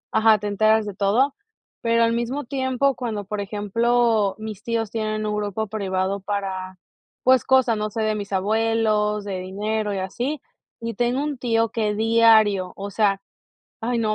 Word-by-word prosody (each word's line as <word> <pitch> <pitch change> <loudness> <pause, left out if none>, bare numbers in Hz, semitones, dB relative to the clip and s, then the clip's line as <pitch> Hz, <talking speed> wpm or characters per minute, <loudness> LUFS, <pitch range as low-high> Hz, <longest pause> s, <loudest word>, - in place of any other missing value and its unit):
ajá, 220 -1 +5
te 210 - -8
enteras 215 +1 +3
de 205 - -5
todo, 215 +8 +2 0.5
pero 230 0 +3
al 230 0 +2
mismo 240 +5 -2
tiempo 260 +1 0
cuando, 220 -5 -4
por 210 +1 -3
ejemplo, 215 +1 +1
mis 215 -2 -7
tíos 230 -2 -2
tienen 215 -1 -2
un 210 0 -1
grupo 210 +1 -2
privado 195 -2 -2
para, 190 -2 -4 0.5
pues, 260 -1 +5
cosas, 260 -4 +3
no 210 0 -2
sé, 220 +1 -3
de 215 0 +1
mis 205 -1 -6
abuelos, 210 +1 +1
de 195 -2 -3
dinero 210 +3 -2
y - - -3
así. 245 +10 -3 0.4
Y 230 0 -4
tengo 245 +6 0
un 295 -3 -3
tío 230 -2 +1
que 210 -2 -1
diario, 220 -4 +4
o 200 +1 -6
sea, 200 -2 +1 0.6
ay 235 +1 -1
no, 215 -2 +1
215 Hz, 170 wpm, -23 LUFS, 205-230 Hz, 0.6 s, ajá